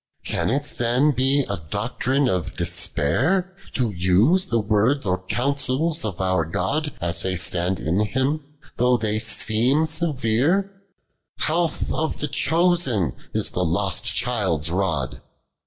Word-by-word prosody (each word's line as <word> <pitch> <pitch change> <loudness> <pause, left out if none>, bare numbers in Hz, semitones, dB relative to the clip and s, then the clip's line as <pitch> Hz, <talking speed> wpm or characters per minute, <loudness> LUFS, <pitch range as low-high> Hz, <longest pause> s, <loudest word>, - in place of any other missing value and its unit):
fan - - 0
it 140 +5 0
tlii'O 130 +1 +1
he 135 +3 +2
a 100 - -3
doctrine 125 - 0
of 90 -7 -2
despair, 180 - +1 0.2
To 120 -5 0
use 100 - +3
the 115 -11 0
words 110 +6 +1
or 90 -1 0
oouncils 140 +5 0
of 100 -6 -4
our 95 -3 +1
God 135 - -2
As 85 -1 -1
they 95 -1 -1
stand 90 0 0
in 85 +5 0
Him, 135 +6 -1 0.3
though 125 0 +3
they 110 -1 0 0.4
worn 135 +7 +3
severe? 160 - +1 0.7
Health 165 +1 -1
of 160 0 -1
tlio 150 -2 -3
elioBen 165 - +1 0.2
is - - 0
the 90 - -1
lost 90 +2 -1
child's 95 -10 +1
rod. 85 -8 -1
120 Hz, 135 wpm, -22 LUFS, 95-150 Hz, 0.7 s, use